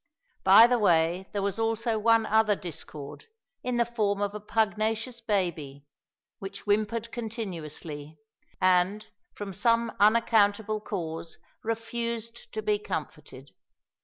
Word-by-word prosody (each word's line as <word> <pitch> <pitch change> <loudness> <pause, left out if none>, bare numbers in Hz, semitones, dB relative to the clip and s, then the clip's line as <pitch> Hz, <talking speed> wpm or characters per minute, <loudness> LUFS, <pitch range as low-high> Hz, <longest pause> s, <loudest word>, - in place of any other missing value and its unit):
By 195 +4 +9
the 245 0 +2
way 175 -1 +2
there 200 -1 -2
was 200 +2 -1
also 225 0 0
one 225 +1 +4
other 220 -1 +3
discord, 155 -5 -8 0.4
in 250 -1 -2
the 235 - +3
form 210 -4 -1
of 205 0 -1
a 210 - -5
pugnacious 220 +3 -1
baby, 170 -10 -2 0.5
which 195 0 -7
whimpered 215 +2 0
continuously, 165 - -6 0.4
and, 185 +3 +2 0.3
from 200 -2 -6
some 230 +3 +2
unaccountable 215 -1 +3
cause, 165 -5 -5 0.2
refused 230 - -4
to 435 - -3
be 420 -1 +1
comforted. 425 - -7
215 Hz, 120 wpm, -28 LUFS, 190-230 Hz, 0.5 s, By